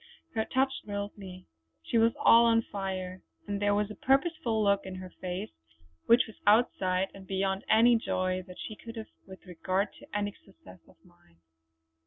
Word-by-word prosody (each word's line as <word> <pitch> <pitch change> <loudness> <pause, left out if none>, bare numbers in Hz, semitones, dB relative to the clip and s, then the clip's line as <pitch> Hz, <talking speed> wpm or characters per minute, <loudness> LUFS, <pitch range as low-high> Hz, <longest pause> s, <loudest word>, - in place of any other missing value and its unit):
Her 220 -1 0
touch 265 +1 +1
thrilled 205 0 -5
me; 185 -2 -10 0.4
she 230 - +1
was 230 +1 +4
all 230 +1 +6
on 230 0 +4
fire, 185 -2 -5 0.2
and 205 -1 -3
there 205 0 +3
was 210 0 0
a - - -8
purposeful 270 -5 +1
look 200 -1 +2
in 190 -1 -7
her 185 -1 -8
face 185 +3 -4 0.6
which 235 +1 +6
was 220 - -13
outside 195 -4 +3
and 190 -1 -12
beyond 190 0 -1
any 235 +2 +6
joy 185 -4 -1
that 180 - -11
she 215 - -7
could 230 +2 -10
have 220 -1 -8 0.2
with 190 0 -13
regard 185 +3 -1
to - - -15
any 205 -1 -2
success 95 - -16
of - - -20
mine. 85 -1 -25
200 Hz, 180 wpm, -29 LUFS, 185-225 Hz, 0.6 s, all